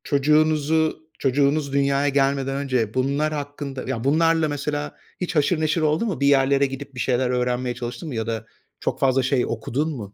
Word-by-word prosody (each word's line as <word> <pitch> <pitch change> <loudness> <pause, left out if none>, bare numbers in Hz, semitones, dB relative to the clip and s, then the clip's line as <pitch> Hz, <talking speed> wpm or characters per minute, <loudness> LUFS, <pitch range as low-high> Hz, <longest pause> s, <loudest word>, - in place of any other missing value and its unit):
Çocuğunuzu 155 +2 +2 0.2
çocuğunuz 140 +1 +1
dünyaya 140 0 +2
gelmeden 135 -1 +1
önce 130 -6 -1
bunlar 140 +4 0
hakkında 145 -2 -5
ya, 115 - -3
bunlarla 160 +3 +3
mesela 145 0 -3 0.3
hiç 180 -1 -3
haşır 155 +2 +2
neşir 155 +1 +1
oldun 155 +8 +1
mu? 195 - -3
Bir 140 - +2
yerlere 140 0 +4
gidip 135 0 -7
bir - - -7
şeyler 125 0 +1
öğrenmeye 125 0 -1
çalıştın 120 +7 -6
mı? 130 - -5
Ya 110 -1 -2
da 110 -1 -3 0.3
çok - - -2
fazla 135 -1 +3
şey 130 -1 +1
okudun 120 +7 -2
mu? 105 -5 -8
140 Hz, 180 wpm, -23 LUFS, 130-150 Hz, 0.3 s, yerlere